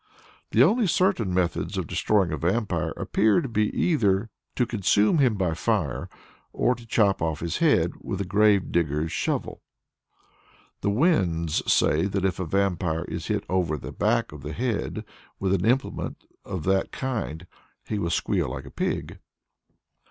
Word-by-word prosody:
The 115 Hz, -, +5 dB
only 215 Hz, -, +3 dB
certain 180 Hz, -, +1 dB
methods 90 Hz, -1 st, -1 dB
of -, -, -1 dB
destroying 100 Hz, -5 st, +1 dB
a 80 Hz, -, -2 dB
vampire 90 Hz, +2 st, 0 dB
appear 105 Hz, -2 st, +2 dB
to -, -, -3 dB
be 110 Hz, -3 st, +1 dB
either 105 Hz, -, +1 dB, 0.2 s
to 125 Hz, -, +2 dB
consume 105 Hz, -, +2 dB
him 125 Hz, -6 st, +3 dB
by 90 Hz, -4 st, 0 dB
fire, -, -, -1 dB, 0.4 s
or 125 Hz, -, +2 dB
to 120 Hz, -1 st, -12 dB
chop 105 Hz, -3 st, +2 dB
off 80 Hz, -2 st, -1 dB
his 85 Hz, -1 st, -2 dB
head -, -, +3 dB
with 95 Hz, -, -4 dB
a 100 Hz, -, -1 dB
grave 100 Hz, +1 st, +3 dB
digger's 80 Hz, -1 st, 0 dB
shovel. -, -, -2 dB, 1.2 s
The -, -, 0 dB
Wends 95 Hz, -, +1 dB
say 80 Hz, +5 st, +3 dB
that 95 Hz, -1 st, -1 dB
if 95 Hz, -2 st, -1 dB
a 95 Hz, -, -2 dB
vampire 90 Hz, -2 st, 0 dB
is -, -, -5 dB
hit -, -, -1 dB
over 90 Hz, -4 st, 0 dB
the -, -, -8 dB
back -, -, 0 dB
of 75 Hz, -1 st, -10 dB
the 75 Hz, +3 st, -6 dB
head 120 Hz, -3 st, -2 dB, 0.3 s
with 95 Hz, -1 st, +1 dB
an 95 Hz, -2 st, +1 dB
implement 125 Hz, +4 st, -1 dB, 0.2 s
of 90 Hz, -5 st, -5 dB
that 95 Hz, +2 st, +1 dB
kind, 110 Hz, -, -4 dB, 0.4 s
he 105 Hz, -, -2 dB
will 85 Hz, -, -1 dB
squeal 85 Hz, -, 0 dB
like -, -, -6 dB
a -, -, -11 dB
pig. -, -, -3 dB
95 Hz, 165 wpm, -25 LUFS, 85-115 Hz, 1.2 s, The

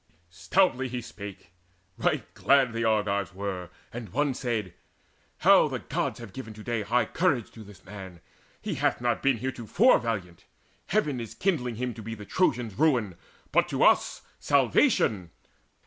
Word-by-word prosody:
Stoutly 130 Hz, -, +1 dB
he 125 Hz, 0 st, -4 dB
spake: 100 Hz, -6 st, -10 dB, 0.4 s
right -, -, 0 dB
glad 135 Hz, -3 st, +3 dB
the 115 Hz, 0 st, -2 dB
Argives 100 Hz, -3 st, 0 dB
were; 95 Hz, -3 st, -4 dB, 0.2 s
And 115 Hz, -3 st, -6 dB
one 140 Hz, +6 st, 0 dB
said: 115 Hz, -8 st, -3 dB, 0.6 s
"How -, -, +6 dB
the -, -, -3 dB
Gods -, -, -3 dB
have 115 Hz, -5 st, -10 dB
given 110 Hz, -5 st, -8 dB
to 110 Hz, -, -10 dB
day 115 Hz, -1 st, -1 dB
High 115 Hz, +3 st, +1 dB
courage 145 Hz, -, 0 dB
to 110 Hz, -, -11 dB
this 100 Hz, -3 st, -15 dB
man! 95 Hz, -3 st, -10 dB, 0.4 s
He -, -, -2 dB
hath -, -, 0 dB
not 120 Hz, -1 st, 0 dB
been 135 Hz, -3 st, +2 dB
Heretofore 130 Hz, -, +2 dB
valiant. 95 Hz, -7 st, -4 dB, 0.4 s
Heaven 150 Hz, -12 st, 0 dB
is 115 Hz, -2 st, -7 dB
kindling 130 Hz, -, 0 dB
him 125 Hz, +1 st, -3 dB
To 110 Hz, -, -9 dB
be 115 Hz, +1 st, -6 dB
the 105 Hz, -1 st, -10 dB
Trojans' 120 Hz, -, 0 dB
ruin, 125 Hz, -, +2 dB, 0.4 s
but -, -, +3 dB
to -, -, 0 dB
us -, -, +3 dB, 0.2 s
Salvation. 95 Hz, -6 st, +2 dB
115 Hz, 160 wpm, -27 LUFS, 100-130 Hz, 0.6 s, How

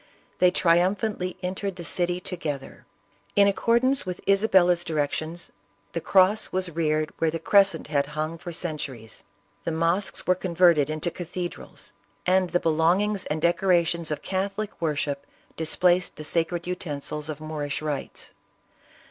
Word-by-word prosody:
They 180 Hz, -, +6 dB
triumphantly 185 Hz, +2 st, +1 dB
entered 190 Hz, +1 st, -3 dB
the 175 Hz, -, -8 dB
city 175 Hz, +2 st, 0 dB
together. 155 Hz, -7 st, -5 dB, 0.5 s
In 200 Hz, 0 st, +6 dB
accordance 235 Hz, +6 st, +2 dB
with 180 Hz, -1 st, -5 dB
Isabella's 190 Hz, -4 st, +4 dB
directions, 160 Hz, +1 st, -2 dB, 0.4 s
the -, -, -2 dB
cross 195 Hz, +3 st, +3 dB
was 185 Hz, -1 st, -1 dB
reared 155 Hz, -1 st, 0 dB
where 165 Hz, -, +2 dB
the 165 Hz, -, -2 dB
crescent 195 Hz, +4 st, +3 dB
had 140 Hz, -2 st, 0 dB
hung 155 Hz, +2 st, -2 dB
for 175 Hz, -, -7 dB
centuries; 150 Hz, -9 st, -5 dB, 0.4 s
the -, -, -2 dB
mosques 165 Hz, +5 st, 0 dB
were 185 Hz, -, +4 dB
converted 170 Hz, -5 st, +3 dB
into 155 Hz, +3 st, -1 dB
cathedrals; 175 Hz, 0 st, -7 dB, 0.3 s
and 185 Hz, 0 st, +3 dB
the 175 Hz, +1 st, +1 dB
belongings 175 Hz, +6 st, +1 dB
and 155 Hz, +1 st, -3 dB
decorations 170 Hz, -2 st, +2 dB
of 150 Hz, -, -4 dB
Catholic 195 Hz, +2 st, -2 dB
worship 145 Hz, -3 st, -2 dB, 0.3 s
dis 160 Hz, -1 st, -1 dB
placed 180 Hz, 0 st, +3 dB
the 155 Hz, -, -8 dB
sacred 165 Hz, +2 st, -1 dB
utensils 150 Hz, -4 st, -4 dB
of 155 Hz, -1 st, -5 dB
Moorish 150 Hz, -2 st, -3 dB
rites. 150 Hz, -3 st, -5 dB
175 Hz, 140 wpm, -25 LUFS, 155-185 Hz, 0.5 s, They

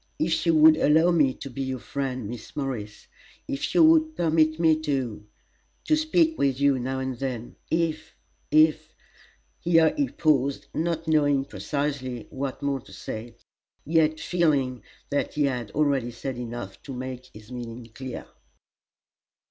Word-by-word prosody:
"If 165 Hz, +2 st, 0 dB
you 165 Hz, -, +4 dB
would 155 Hz, 0 st, +7 dB
allow 160 Hz, +3 st, +4 dB
me 150 Hz, -6 st, +4 dB
to -, -, -8 dB
be 135 Hz, -, -5 dB
your 130 Hz, -1 st, -2 dB
friend, 130 Hz, 0 st, -4 dB
Miss 120 Hz, 0 st, -9 dB
Morris 125 Hz, -8 st, -4 dB, 0.4 s
if 135 Hz, -, -3 dB
you 335 Hz, -, +7 dB
would 315 Hz, 0 st, +5 dB
permit 155 Hz, -1 st, +2 dB
me 160 Hz, -2 st, +4 dB
to 130 Hz, -9 st, -3 dB, 0.6 s
to 310 Hz, -, +4 dB
speak 320 Hz, +1 st, +2 dB
with 135 Hz, -1 st, +1 dB
you 140 Hz, -2 st, +3 dB
now 130 Hz, +2 st, -2 dB
and 130 Hz, -2 st, -4 dB
then; 125 Hz, -3 st, -4 dB
if 160 Hz, -1 st, -1 dB, 0.3 s
if 155 Hz, 0 st, +3 dB, 0.3 s
" -, -, -36 dB
Here 165 Hz, -2 st, +4 dB
he 285 Hz, -2 st, 0 dB
paused, 140 Hz, -3 st, +1 dB
not 165 Hz, 0 st, -2 dB
knowing 145 Hz, -3 st, +3 dB
precisely 140 Hz, -6 st, -3 dB
what 135 Hz, +1 st, -4 dB
more 140 Hz, -1 st, 0 dB
to -, -, -17 dB
say, 115 Hz, +1 st, -7 dB, 0.5 s
yet 155 Hz, 0 st, +2 dB
feeling 145 Hz, -7 st, +1 dB, 0.3 s
that 145 Hz, -, -1 dB
he 150 Hz, -, +2 dB
had 125 Hz, -5 st, -1 dB
already 140 Hz, -5 st, +1 dB
said 125 Hz, +2 st, -5 dB
enough 120 Hz, -5 st, -7 dB
to 135 Hz, -, -8 dB
make 130 Hz, 0 st, -6 dB
his 105 Hz, +3 st, -14 dB
meaning 120 Hz, -1 st, -7 dB
clear. 130 Hz, 0 st, -7 dB
140 Hz, 155 wpm, -26 LUFS, 125-155 Hz, 0.6 s, would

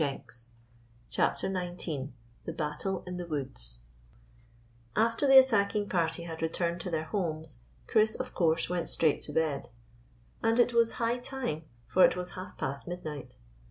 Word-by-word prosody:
216 130 Hz, -5 st, -3 dB, 0.6 s
CHAPTER -, -, +1 dB
XIX 175 Hz, -7 st, -3 dB, 0.3 s
THE 165 Hz, -, -3 dB
BATTLE 165 Hz, +4 st, -2 dB
IN 180 Hz, 0 st, -5 dB
THE 175 Hz, -1 st, -5 dB
WOODS 130 Hz, -, -1 dB, 1.1 s
A 220 Hz, -, +5 dB
FTER 230 Hz, +5 st, 0 dB
the 270 Hz, 0 st, +9 dB
attacking 210 Hz, -5 st, +5 dB
party 170 Hz, -1 st, +1 dB
had 165 Hz, -1 st, -6 dB
returned 170 Hz, +1 st, -1 dB
to 180 Hz, -, -4 dB
their 160 Hz, -2 st, -1 dB
homes 160 Hz, -, -3 dB, 0.3 s
Chris, 215 Hz, -, +3 dB
of 255 Hz, 0 st, -5 dB
course, 165 Hz, -1 st, +2 dB
went 175 Hz, -1 st, -2 dB
straight 155 Hz, -3 st, +2 dB
to -, -, -7 dB
bed; 155 Hz, -5 st, 0 dB, 0.7 s
and 225 Hz, +1 st, +3 dB
it 240 Hz, 0 st, +5 dB
was 230 Hz, -1 st, +4 dB
high 235 Hz, +1 st, 0 dB
time, 245 Hz, -, -4 dB, 0.2 s
for 185 Hz, -, +5 dB
it -, -, +6 dB
was 180 Hz, 0 st, -4 dB
half 185 Hz, 0 st, -8 dB
past 140 Hz, +4 st, -3 dB
midnight. 150 Hz, -7 st, -6 dB
175 Hz, 160 wpm, -30 LUFS, 155-205 Hz, 1.1 s, the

